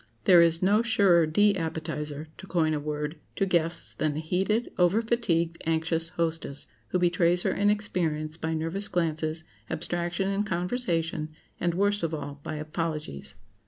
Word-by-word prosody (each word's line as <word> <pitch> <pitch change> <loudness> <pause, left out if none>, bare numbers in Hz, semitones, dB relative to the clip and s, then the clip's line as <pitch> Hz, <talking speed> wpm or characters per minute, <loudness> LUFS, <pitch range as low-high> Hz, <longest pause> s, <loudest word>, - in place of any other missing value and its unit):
There 180 -5 +7
is 165 +1 +3
no 205 +4 +4
surer 200 -8 +4
de 205 +6 +4
appetizer—to 155 -1 -5
coin 160 -4 +1
a 150 - 0
word—to 150 +5 -3
guests 170 -2 0
than 150 -2 -1
a - - -2
heated, 190 +8 0
over 180 +4 +4
fatigued, 180 -8 0
anxious 165 0 +1
hostess, 165 -4 -2 0.2
who - - 0
betrays 175 0 +3
her - - +1
inexperience 180 -7 0
by 160 -1 -2
nervous 165 +6 -1
glances, 160 -2 -1 0.3
abstraction 175 +3 -2
in 200 +1 0
conversation, 175 -5 -1 0.3
and, 170 -1 0
worst 205 +2 +2
of 165 -1 -1
all, 145 -1 -6
by 155 - -5
apologies. 150 - -4
165 Hz, 145 wpm, -27 LUFS, 155-185 Hz, 0.3 s, There